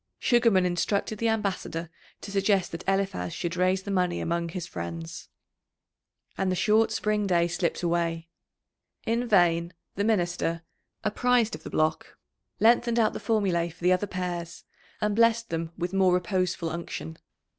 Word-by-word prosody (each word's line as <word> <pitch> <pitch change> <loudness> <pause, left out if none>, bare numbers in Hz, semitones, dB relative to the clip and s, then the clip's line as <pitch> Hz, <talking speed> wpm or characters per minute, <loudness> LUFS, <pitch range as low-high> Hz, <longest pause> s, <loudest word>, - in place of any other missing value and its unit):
Sugarman 230 -6 +3
instructed 200 +4 -1
the 230 - +1
ambassador 190 -6 -2 0.3
to 200 - -7
suggest 195 -1 +1
that 165 +2 -6
Eliphaz 195 - 0
should 170 0 -3
raise 185 +1 +1
the 200 - -4
money 180 -2 +1
among 170 0 -1
his 175 0 -5
friends. 85 - -7 1.1
And 190 -1 +1
the - - +1
short 215 +4 +3
spring 210 -1 0
day 170 -2 +3
slipped 175 0 -2
away. 170 -1 0 0.8
In 235 +2 0
vain 175 -4 +3 0.2
the 200 - -1
minister, 175 -5 0 0.4
apprised 235 +2 +2
of - - -6
the - - -8
block, 155 0 -1 0.4
lengthened 235 +1 +4
out 220 -2 +3
the - - -5
formulæ 185 -7 0
for 170 +1 -17
the 180 +1 +5
other 185 +3 0
pairs, 175 -2 -4 0.4
and 210 -1 +1
blessed 230 -1 +3
them 165 0 -2
with 175 +1 -3
more 190 -2 +4
reposeful 180 -2 -1
unction. 120 - -6
185 Hz, 155 wpm, -27 LUFS, 170-210 Hz, 1.1 s, the